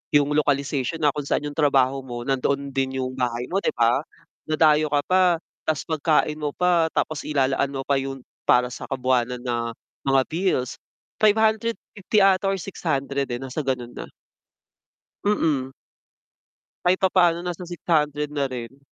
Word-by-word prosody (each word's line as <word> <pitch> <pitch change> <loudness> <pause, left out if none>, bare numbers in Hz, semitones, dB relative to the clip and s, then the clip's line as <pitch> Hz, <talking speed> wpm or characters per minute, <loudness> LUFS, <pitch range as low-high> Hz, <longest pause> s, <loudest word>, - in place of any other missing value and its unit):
yung 145 -1 +4
localization 145 +1 0
na 145 - +5
kung 145 0 -5
saan - - 0
yung 145 - -12
trabaho 135 -2 +3
mo 120 -1 -6
nandoon 140 +1 0
din 135 0 -1
yung 130 - -2
bahay 120 -1 -1
mo, 195 - +2
'di - - -1
ba? 120 +2 +3 0.5
Dadayo 155 -1 +4
ka 145 -1 +1
pa 185 0 +3 0.5
tapos 155 -2 0 0.2
pagkain 155 -1 +2
mo 150 -1 -2
pa 175 -2 +3
tapos 155 -1 -1
ilalaan 140 -1 +1
mo 135 - -3
pa 140 0 +1
yung 135 -1 -5 0.2
para 125 0 +4
sa - - -7
kabuwanan 125 -2 0
na 120 -2 -2 0.3
mga 135 0 +5
bills. 165 -7 0 0.5
550 215 -1 +2
ata 195 0 +4
or 195 - +1
600, 140 -7 -2
eh, 120 - -3
nasa 135 +4 -5
gano'n 125 -4 -2
na. - - -8 1.2
Mm. 150 -10 +1 1.1
Kahit 180 +1 +3
papaano 175 -2 +3
nasa 180 0 -5
600 150 -4 0
na 145 -2 -1
rin. 130 0 -7
145 Hz, 150 wpm, -24 LUFS, 130-165 Hz, 1.2 s, na